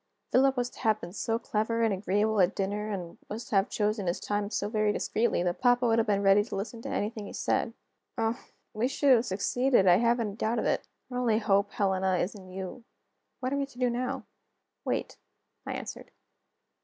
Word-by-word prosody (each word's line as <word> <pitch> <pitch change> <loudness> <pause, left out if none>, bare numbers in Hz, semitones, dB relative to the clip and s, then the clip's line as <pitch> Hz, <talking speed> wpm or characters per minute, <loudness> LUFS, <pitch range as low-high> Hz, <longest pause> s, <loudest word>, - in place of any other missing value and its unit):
"Philip 270 +1 +4
was 245 0 -1
to - - -15
have 220 -3 +2
been 175 - -8
so 225 +2 -1
clever 230 0 -1
and 220 -2 +3
agreeable 205 +2 +1
at 180 +3 +3
dinner, 205 +2 -2
and 180 -5 -5
was 220 +3 -5
to - - -3
have 195 +1 +3
chosen 210 -2 0
his 175 +2 0
time 205 +1 -2
so 205 -1 -1
very 215 -1 +1
discreetly, 220 -2 0
that 175 -1 -1
papa 245 0 +4
would 230 -1 +3
have 225 - +1
been 200 -1 +2
ready 195 +1 +6
to 205 - -6
listen 215 +4 -5
to - - -6
anything 210 0 -2
he - - -9
said. 230 - 0 0.4
Oh, 225 +1 -1 0.3
we 225 +3 +1
should 275 +1 +2
have 235 0 +3
succeeded; 225 +4 +2
I 180 -1 +7
haven't 235 -1 +2
a - - -10
doubt 225 +2 0
of - - 0
it! - - 0 0.2
Our 250 - -2
only 230 -3 +2
hope, 200 -2 +2
Helena, 190 -2 +1
is 180 +2 -1
in 190 -3 -12
you. 190 +5 -7 0.6
What 255 +1 -1
are - - +1
we 280 -1 -1
to 260 - -18
do 250 -1 +2
now?" 255 +2 -3 0.6
"Wait," - - -2 0.5
I - - -2
answered. - - -7
215 Hz, 215 wpm, -29 LUFS, 200-235 Hz, 0.6 s, I